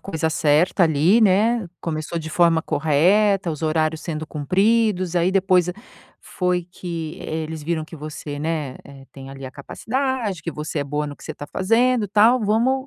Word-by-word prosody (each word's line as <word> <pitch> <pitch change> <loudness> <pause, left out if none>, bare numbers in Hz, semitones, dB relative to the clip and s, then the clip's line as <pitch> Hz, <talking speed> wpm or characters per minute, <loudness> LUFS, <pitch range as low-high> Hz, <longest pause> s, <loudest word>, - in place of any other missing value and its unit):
coisa 160 -4 -2
certa 155 +5 +2
ali, 165 +7 +4
né, 215 +2 +3
começou 160 +1 -3
de 160 0 -6
forma 170 -1 +3
correta, 180 +6 +2
os 155 0 -6
horários 155 0 0
sendo 155 -2 -5
cumpridos, 185 +4 +1
aí 175 +1 +2
depois 185 -2 +2 0.5
foi 180 -1 -1
que, 165 -4 -6
eh, 160 0 -4
eles 155 -1 -6
viram 160 0 -2
que 165 - -11
você, 150 -1 -7
né, 150 -4 -3
eh, 135 -1 -13
tem 135 -1 -10
ali 135 0 -9
a 130 - -6
capacidade, 225 - -3
que 170 - -3
você 150 0 -5
é 140 - -1
boa 150 +1 -2
no 145 - -8
que - - -15
você - - -6
tá 145 - -8
fazendo, 225 +4 +1
tal, 225 +5 +4
"Vamos, 240 +6 +1
170 Hz, 175 wpm, -22 LUFS, 155-200 Hz, 0.5 s, ali